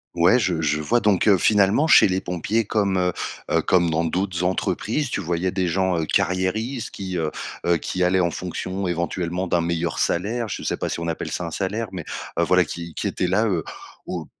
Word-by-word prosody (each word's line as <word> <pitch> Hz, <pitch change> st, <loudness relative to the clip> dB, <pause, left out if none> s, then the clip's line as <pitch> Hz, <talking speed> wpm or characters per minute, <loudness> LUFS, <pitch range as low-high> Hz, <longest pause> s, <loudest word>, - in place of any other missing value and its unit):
Ouais, 90 Hz, +9 st, +5 dB
je 90 Hz, -7 st, 0 dB
je 75 Hz, -1 st, 0 dB
vois 120 Hz, +11 st, +1 dB
donc 105 Hz, -3 st, +2 dB
heu, 100 Hz, -3 st, +6 dB
finalement 105 Hz, -, +3 dB
chez 160 Hz, -, +7 dB
les 95 Hz, 0 st, 0 dB
pompiers 95 Hz, +5 st, -1 dB
comme, 100 Hz, -2 st, +1 dB
heu 90 Hz, -1 st, +1 dB, 0.4 s
heu, -, -, +3 dB
comme 85 Hz, -2 st, +2 dB
dans 80 Hz, +1 st, +1 dB
d'autres 90 Hz, +1 st, -1 dB
entreprises, 115 Hz, +8 st, -1 dB
tu -, -, -1 dB
voyais 90 Hz, +1 st, -1 dB
des 95 Hz, -1 st, 0 dB
gens, 90 Hz, 0 st, +1 dB
heu, 80 Hz, -, -1 dB
carriéristes 110 Hz, +7 st, 0 dB
qui, 95 Hz, -2 st, -6 dB
heu 80 Hz, -1 st, 0 dB, 0.4 s
heu, 85 Hz, -1 st, +4 dB
qui 90 Hz, +2 st, -2 dB
allaient 90 Hz, +1 st, +3 dB
en 85 Hz, -2 st, +2 dB
fonction, 95 Hz, +1 st, -4 dB
éventuellement, 85 Hz, +1 st, -2 dB
d'un 85 Hz, -1 st, +1 dB
meilleur 85 Hz, 0 st, -1 dB
salaire. 110 Hz, +7 st, 0 dB
Je -, -, -5 dB
sais -, -, -1 dB
pas -, -, -2 dB
si -, -, -3 dB
on 85 Hz, -, -3 dB
appelle 80 Hz, -, -3 dB
ça 90 Hz, -, -3 dB
un 85 Hz, -, -5 dB
salaire, 100 Hz, +5 st, -2 dB
mais 90 Hz, -4 st, -6 dB, 0.3 s
heu, -, -, +4 dB
voilà -, -, +4 dB
qui 85 Hz, -1 st, -7 dB
qui -, -, -4 dB
étaient 90 Hz, -, 0 dB
là, 100 Hz, +5 st, +2 dB
heu, 90 Hz, -7 st, 0 dB, 0.4 s
au -, -, -4 dB
90 Hz, 215 wpm, -23 LUFS, 85-100 Hz, 0.4 s, chez